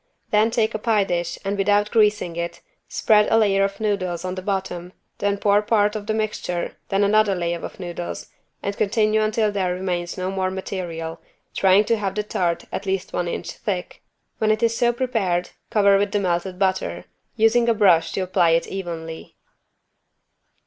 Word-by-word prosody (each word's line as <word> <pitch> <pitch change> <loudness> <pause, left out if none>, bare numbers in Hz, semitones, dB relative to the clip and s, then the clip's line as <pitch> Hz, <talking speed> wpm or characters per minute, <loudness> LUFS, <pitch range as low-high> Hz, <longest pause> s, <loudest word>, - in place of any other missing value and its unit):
Then 215 +1 +4
take 225 -1 +1
a 215 - -2
pie 215 -2 +2
dish 175 -2 -2
and 200 +1 0
without 205 +1 +2
greasing 210 -6 +2
it, 170 0 -4 0.3
spread 210 -1 +3
a 225 - +5
layer 200 -3 +3
of 195 +1 -2
noodles 185 -5 -1
on 185 - -2
the 185 - -5
bottom, 185 -2 -3 0.3
then 200 0 0
pour 205 0 +3
part 210 0 +2
of 210 -1 -5
the 215 - 0
mixture, 210 -5 -2
then 195 +1 +2
another 205 -1 +3
layer 170 -1 -2
of - - -8
noodles 175 -1 -6 0.3
and 200 0 -2
continue 215 +1 +2
until 215 0 +1
there 185 -3 -1
remains 180 -2 -3
no 185 +1 -2
more 190 -1 -1
material, 175 -4 -5 0.3
trying 190 +2 +4
to 230 - +2
have 195 -2 -3
the 210 - -1
tart 175 -5 -1
at 200 - -5
least 190 -1 -2
one 175 - -1
inch - - -4
thick. 185 -4 -4 0.4
When 215 - +2
it 215 +1 +1
is 230 0 +2
so 240 +1 +3
prepared 225 -8 -1 0.2
cover 200 -2 +4
with 200 0 -1
the 205 - +2
melted 180 0 -1
butter, 190 -1 -1 0.3
using 235 +1 +3
a 230 - +3
brush 180 -6 +4
to - - -1
apply 180 -2 +2
it - - -3
evenly. 165 -4 -6
195 Hz, 185 wpm, -22 LUFS, 180-215 Hz, 0.4 s, a